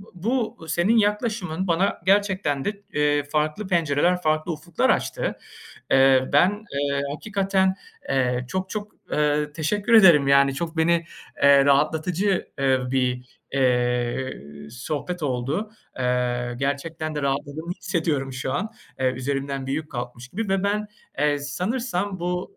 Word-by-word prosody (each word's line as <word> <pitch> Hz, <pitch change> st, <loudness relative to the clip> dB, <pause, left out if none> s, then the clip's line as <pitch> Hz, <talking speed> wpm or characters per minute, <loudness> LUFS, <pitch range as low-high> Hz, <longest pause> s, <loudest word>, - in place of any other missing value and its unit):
bu 220 Hz, -1 st, -2 dB
senin 175 Hz, +8 st, +2 dB
yaklaşımın 205 Hz, -4 st, 0 dB
bana 180 Hz, +4 st, +1 dB
gerçekten 190 Hz, -8 st, +2 dB
de, 205 Hz, 0 st, -4 dB
eee, 145 Hz, 0 st, +2 dB
farklı 155 Hz, +7 st, -1 dB
pencereler, 175 Hz, 0 st, +1 dB
farklı 155 Hz, +2 st, 0 dB
ufuklar 160 Hz, +2 st, 0 dB
açtı. -, -, -1 dB, 0.5 s
Eee, 135 Hz, -1 st, +5 dB
ben, 175 Hz, +6 st, +5 dB, 0.2 s
eee, 140 Hz, 0 st, 0 dB
hakikaten, 190 Hz, 0 st, 0 dB, 0.3 s
eee, 125 Hz, -2 st, +1 dB
çok 185 Hz, 0 st, -3 dB
çok, 210 Hz, 0 st, -5 dB, 0.2 s
eee, 150 Hz, 0 st, +1 dB
teşekkür 205 Hz, +9 st, 0 dB
ederim, 170 Hz, -10 st, +7 dB
yani 140 Hz, -1 st, +5 dB
çok 165 Hz, +3 st, -4 dB
beni, 170 Hz, +1 st, +2 dB, 0.4 s
eee, 140 Hz, -1 st, +7 dB
rahatlatıcı, 160 Hz, +7 st, +1 dB
eee, 135 Hz, -1 st, +3 dB
bir, 125 Hz, -1 st, 0 dB, 0.3 s
eee, 125 Hz, -1 st, +1 dB, 0.4 s
sohbet 150 Hz, +7 st, -4 dB
oldu. 140 Hz, -, -2 dB, 0.3 s
Eee, 125 Hz, -1 st, 0 dB
gerçekten 155 Hz, +3 st, -3 dB
de 150 Hz, -, -3 dB
rahatlığımı 145 Hz, +5 st, -2 dB
hissediyorum 160 Hz, -8 st, -2 dB
şu 130 Hz, +1 st, -3 dB
an, 210 Hz, +10 st, -2 dB, 0.3 s
eee, 130 Hz, -, +2 dB
üzerimden 135 Hz, +1 st, -3 dB
büyük 140 Hz, +3 st, -1 dB
bir -, -, -12 dB
yük -, -, -25 dB
kalkmış 120 Hz, 0 st, -6 dB
gibi. 210 Hz, +5 st, -4 dB
Ve 195 Hz, 0 st, +1 dB
ben, 210 Hz, +1 st, 0 dB, 0.3 s
eee, 145 Hz, 0 st, +2 dB
sanırsam 190 Hz, -, -2 dB
bu, 180 Hz, -, -3 dB
155 Hz, 135 wpm, -24 LUFS, 135-185 Hz, 0.5 s, ederim